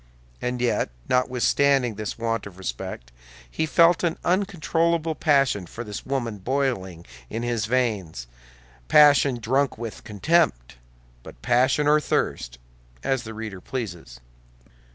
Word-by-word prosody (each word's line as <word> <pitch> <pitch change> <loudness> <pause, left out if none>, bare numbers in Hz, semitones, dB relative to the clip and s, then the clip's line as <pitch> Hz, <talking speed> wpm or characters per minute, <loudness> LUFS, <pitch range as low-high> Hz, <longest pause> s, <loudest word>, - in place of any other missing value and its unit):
And 125 0 -2
yet, 125 - +1 0.2
notwithstanding 125 0 +2
this 105 0 -5
want 115 -2 -2
of 95 -2 -13
respect, 60 -7 -6 0.4
he 160 - -2
felt 170 +1 +4
an 170 -2 0
uncontrollable 170 -3 +1
passion 135 - +2
for 115 - -7
this 105 -3 -8
woman 120 -6 -2
boiling 95 -8 -2 0.2
in 115 +2 -4
his 120 -3 -1
veins—passion 80 - +1
drunk 130 +4 0
with 115 -1 -7
contempt; 105 - 0 0.4
but - - -13
passion 125 +4 +2
or 150 +1 +5
thirst, - - -2 0.5
as 135 -2 0
the 110 -2 -9
reader 105 -4 -7
pleases. 85 - -6
120 Hz, 120 wpm, -24 LUFS, 95-140 Hz, 0.5 s, or